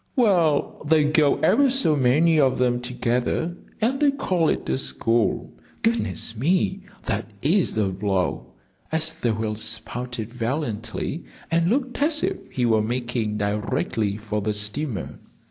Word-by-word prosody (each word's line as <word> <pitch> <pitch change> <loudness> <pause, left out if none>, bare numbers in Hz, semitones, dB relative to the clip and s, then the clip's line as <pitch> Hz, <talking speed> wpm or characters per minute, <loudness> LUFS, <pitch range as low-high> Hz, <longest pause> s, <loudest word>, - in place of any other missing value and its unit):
"Well, 175 - +2
they 155 0 +5
go 150 -1 +3
ever 280 -1 +4
so 245 - +2
many 150 +5 +3
of 130 -3 +3
them 125 -1 +1
together, 125 +7 -1 0.2
and 250 +5 +1
they 295 - +4
call 185 - +1
it - - -2
a - - 0
school. 115 -4 0 0.3
Goodness 225 - 0
me 180 - +1 0.2
that 110 +3 -2
is 170 - +2
a 105 -3 +2
blow!" 95 -1 -1 0.4
as 160 0 0
the 120 - -1
whale 110 0 -2
spouted 115 +1 -3
valiantly, 120 +3 -3 0.3
and 170 +1 +2
looked 255 +3 -1
as 300 0 +2
if - - -3
he 125 - -1
were 110 -2 +3
making 120 -2 -2
directly 105 0 -1
for 105 -1 -3
the 105 +1 -1
steamer. 105 +4 -2
125 Hz, 145 wpm, -24 LUFS, 110-165 Hz, 0.4 s, they